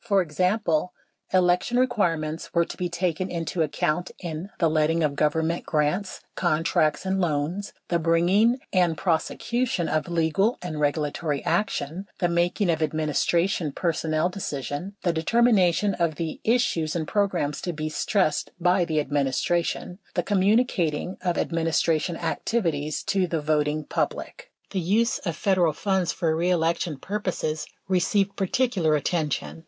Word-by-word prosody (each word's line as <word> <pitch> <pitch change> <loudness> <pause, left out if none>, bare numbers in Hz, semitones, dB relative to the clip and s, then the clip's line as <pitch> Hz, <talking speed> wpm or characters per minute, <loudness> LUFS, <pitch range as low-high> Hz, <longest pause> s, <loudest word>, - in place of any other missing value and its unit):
For 200 -5 +3
example, 180 +1 0 0.4
election 180 +6 +2
re 255 - +5
quirements 165 -9 -1
were 170 0 +4
to - - -8
be 180 -1 -2
taken 175 +1 -1
into 170 0 -2
account 155 +3 0
in: 170 +1 -6
The 170 - +3
letting 160 +1 +2
of 145 -2 0
Govern 155 +2 +1
ment 170 +1 -1
grants, 155 +6 -1
contracts, 155 -2 +1
and 190 0 0
loans; 165 +4 -1 0.2
the 170 - +2
bringing 175 +9 +3 0.2
and 175 -4 +3
prosecution 190 +3 0
of 155 +1 -1
legal 170 +7 +1
and 165 -4 -5
regulatory 150 0 -1
action; 175 -1 -1
the 175 - +1
making 175 +2 +1
of 160 -1 -1
administration 155 +2 0
personnel 160 -2 0
decision; 180 0 -4
the 175 -3 +2
determination 200 +1 +3
of 170 -3 0
the 160 0 -4
issues 175 -10 +1
and 160 -3 -2
programs 190 -8 0
to 175 - -2
be 155 -1 -4
stressed 155 +1 0
by 180 +1 +3
the 160 -3 0
administration; 145 +6 -1 0.2
the 175 - +1
communicating 195 -4 +1
of 175 -2 0
administration 165 0 0
activities 155 -10 -1
to 195 -2 +1
the 165 -2 -1
voting 150 0 0
public. - - -3 0.2
The 195 - -1
use 210 +7 +1
of 170 -5 -3
Federal 180 -3 +2
funds 190 -1 0
for 165 -3 0
reelection 170 -2 0
purposes 180 -4 -3 0.2
received 195 +2 +1
particu 210 +2 0
lar 155 -1 +3
attention. 155 +1 -1
170 Hz, 140 wpm, -25 LUFS, 155-190 Hz, 0.4 s, re